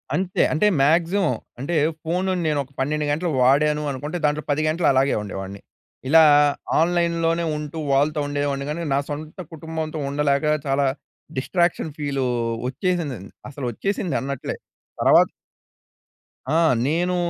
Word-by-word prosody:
అంతే, 185 -1 0
అంటే 160 +7 +3
మాక్సిమం. 165 +2 +2 0.3
అంటే 145 +6 -3 0.3
ఫోన్ 180 +3 -1 0.2
నేను 150 -2 +1
ఒక 135 - -21
12 150 +3 0
గంటలు 170 +4 -1
వాడాను 150 +3 +3
అనుకుంటే, 145 +6 -4
దాంట్లో 150 +1 0
10 145 +2 +1
గంటలు 165 +2 +1
అలాగే 135 +1 +3
ఉండేవాడిని. 100 -1 -7 0.5
ఇలా 160 +3 +7 0.6
ఆన్‌లైన్‌లోనే 170 0 +1
ఉంటూ, 150 +1 -6 0.2
వాళ్ళతో 150 +2 +2
ఉండేవాడిని. 145 -1 -2
కాని 170 +3 -3
నా 140 - +3
సొంత 155 +4 -7
కుటుంబంతో 160 0 -5
ఉండలేక 140 0 +1 0.2
చాలా 140 +1 +2 0.5
డిస్ట్రాక్షన్ 170 +2 0
ఫీలు 140 -3 -2 0.4
వచ్చేసింది. 155 0 -2 0.3
అసలు 140 -1 -6
వచ్చేసింది. 190 - -2
అన్నట్లే 140 -1 -4 0.5
తర్వాత - - +6 1.3
ఆ! - - +5 0.3
నేను 175 +4 0
150 Hz, 125 wpm, -22 LUFS, 140-170 Hz, 1.3 s, ఇలా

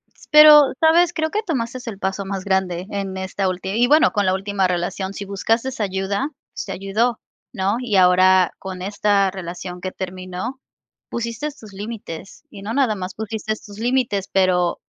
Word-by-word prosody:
S - - -19
pero, 300 -1 +9
¿sabes?, 335 +2 +4
creo 315 -1 -1
que 430 +2 -1
tomaste 255 - -3
el 200 -3 -8
paso 190 0 -2
más 195 -1 -4
grande 190 -2 -1
en 195 -1 -3
esta 190 +1 -2
últi 185 +1 -4
y 240 +3 +2
bueno, 305 +3 +5
con 205 -3 0
la 185 - +2
última 195 0 0
relación, 180 +2 -2
si 200 - -6
buscaste 225 +6 0
ayuda, 200 +6 -1 0.4
te 195 - -6
ayudó, 210 +5 -1 0.3
¿no? 200 0 0
Y 235 -5 -2
ahora, 185 0 +5
con 185 -1 -7
esta 200 0 +1
relación 180 -1 -7
que 185 - -4
terminó, 185 +8 -6 0.5
pusiste 235 +5 -3
tus 215 -8 -14
límites, 200 - -8
y 200 -5 -11
no 215 +3 -4
nada 255 -6 +2
más 185 -1 -5
pusiste 220 0 -3
tus 205 0 -11
límites, 235 -5 0
pero 180 -2 +2
200 Hz, 175 wpm, -21 LUFS, 190-230 Hz, 0.5 s, pero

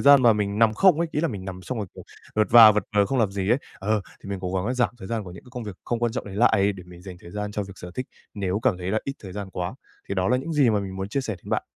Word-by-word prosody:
gian 140 -2 +7
mà 120 - +7
mình 105 -1 -1
nằm 110 -1 +4
không 180 - +5
ấy, 170 -1 0
ý 150 - 0
là 165 - +1
mình 100 -6 -6
nằm 95 -1 -7
xong 125 +4 -4
rồi, 105 - -3
kiểu, - - -11 0.3
vật 110 0 +3
và 115 -2 +10
vật 105 - 0
vờ, 100 - +5
không 135 - -1
làm 110 -4 +2
gì 100 0 -2
ấy. 120 - +4 0.2
Ờ, 105 +2 0 0.2
thì - - -9
mình 100 - -3
cố 90 0 -3
gắng 95 +1 0
là 125 - 0
giảm 125 -1 +2
thời 95 - -9
gian 115 -3 -2
của 90 - -9
những 90 - -12
cái 125 - -16
công 125 -2 -5
việc 105 -4 -7
không 120 - -1
quan 120 -1 0
trọng 130 - -3
đấy 100 -1 -8
lại, 100 -3 +4
để 95 - -10
mình 90 0 -13
dành 95 -1 -9
thời 85 - -12
gian 105 +1 -4
cho 105 - -2
việc 95 0 -9
sở 90 - -8
thích, 130 - -3 0.3
nếu 100 0 -1
cảm 120 -9 +2
thấy 90 +1 -3
là 110 - +2
ít 140 - -2
thời 95 - -8
gian 100 0 -6
quá. 90 +4 -4 0.3
Thì 100 - -2
đó 95 -1 +1
là 125 - +3
những 140 +6 -4
gì 140 -6 +4
mà 105 -2 +1
mình 95 -1 -6
muốn 95 +1 -4
chia 140 - -1
sẻ 110 -7 -4
đến - - -9
bạn. - - +1
105 Hz, 350 wpm, -25 LUFS, 95-120 Hz, 0.3 s, và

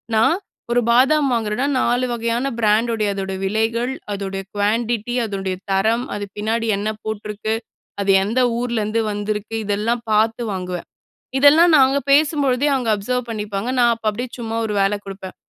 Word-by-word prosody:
நான் 225 +10 +4 0.4
ஒரு 245 0 +3
பாதாம் 275 +5 +4
வாங்குறன்னா, 225 +2 0
4 245 +2 +1
வகையான 235 +2 -1
பிராண்ட்டுடைய 220 0 +2
அதோட 195 -1 -4
விலைகள், 225 +5 0 0.2
அதோடைய 195 -1 -4
குவான்டிட்டி, 225 +3 0
அதோடைய 195 -3 -3 0.2
தரம், 220 +6 +2
அது 205 0 -4
பின்னாடி 225 +2 -1
என்ன 205 +2 -2
போட்டிருக்கு? 215 0 -3 0.5
அது 195 0 +2
எந்த 225 +6 0 0.2
ஊர்லருந்து 230 -2 -1
வந்திருக்கு? 210 +1 -3
இதெல்லாம் 215 +4 0
பார்த்து 225 +2 +2
வாங்குவேன். 180 -2 -5 0.5
இதெல்லாம் 315 +4 +6
நாங்க 270 0 +4
பேசும்பொழுதே 285 -2 +3
அவுங்க 245 -4 0
அப்சர்வ் 250 +4 -2
பண்ணிப்பாங்க. 210 +1 -3
நான் 240 -1 +5
அப்ப 225 - -15
அப்பிடியே 240 +4 -5
சும்மா 225 -1 -4
ஒரு 210 - -3
வேல 195 +1 +2
கொடுப்பேன். 195 -1 -8
225 Hz, 145 wpm, -20 LUFS, 205-245 Hz, 0.5 s, இதெல்லாம்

